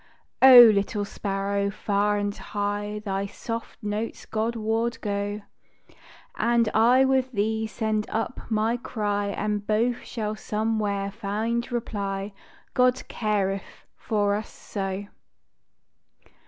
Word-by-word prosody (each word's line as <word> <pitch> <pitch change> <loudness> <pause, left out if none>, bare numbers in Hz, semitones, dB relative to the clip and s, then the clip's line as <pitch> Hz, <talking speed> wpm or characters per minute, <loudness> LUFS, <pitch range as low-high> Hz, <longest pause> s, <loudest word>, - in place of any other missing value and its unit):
O 260 -2 +11
little 205 -1 +3
sparrow, 200 0 -2
far 205 0 0
and 205 0 -2
high 205 +1 -3
Thy 195 0 -1
soft 230 +3 -6
notes 210 +2 -3
God 225 +2 -2
ward 225 +1 -1
go, 205 0 -2 0.9
And 235 -1 +2
I 245 +4 +5
with 265 -1 +1
thee 220 +1 0
send 215 -1 -2
up 225 +3 -3
my 220 +2 +1
cry, 205 -4 -2
And 205 0 -2
both 235 +3 +2
shall 215 -2 -4
somewhere 210 -2 -1
find 225 +4 -2
reply, 200 -4 -3 0.4
_God 250 0 +2
careth 200 -3 -2
for 205 -2 0
us 210 +1 -3
so. 195 -1 -5
210 Hz, 115 wpm, -25 LUFS, 205-230 Hz, 0.9 s, O